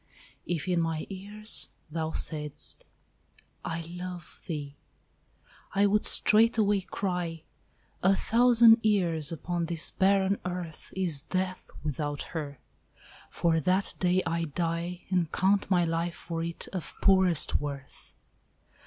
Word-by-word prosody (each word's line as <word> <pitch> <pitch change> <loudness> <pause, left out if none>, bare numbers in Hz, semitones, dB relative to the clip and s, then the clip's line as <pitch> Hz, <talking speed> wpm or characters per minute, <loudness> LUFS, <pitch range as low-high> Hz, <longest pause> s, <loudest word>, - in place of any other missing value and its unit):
If 175 0 -2
in 175 -2 +1
my 165 -1 -2
ears 205 +3 +2 0.2
Thou 160 0 -2
saidst, 150 -2 -2 0.8
"I 165 0 -3
love 175 0 -8
thee!" 145 -4 -5 1.0
I 200 +1 +4
would 210 +1 +2
straightway 215 -2 +4
cry, 180 -4 -4 0.6
"A 195 +2 +4
thousand 230 +1 +5
years 175 -8 +1
upon 170 +1 -3
this 165 -1 -2
barren 195 0 +2
earth 175 -3 -6
Is 175 -7 +2
death 185 +3 -3
without 145 -1 -3
her: 145 -4 -5 0.7
for 165 -1 +1
that 185 +5 0
day 180 0 +2
I 165 0 -1
die, 170 +3 -3
And 175 -4 +1
count 195 +2 +1
my 175 -3 +3
life 165 +1 -2
for 165 -1 -5
it 170 0 -6
of 185 -4 -6
poorest 185 -8 +4
worth." 140 -2 -8
175 Hz, 120 wpm, -28 LUFS, 165-190 Hz, 1.0 s, thousand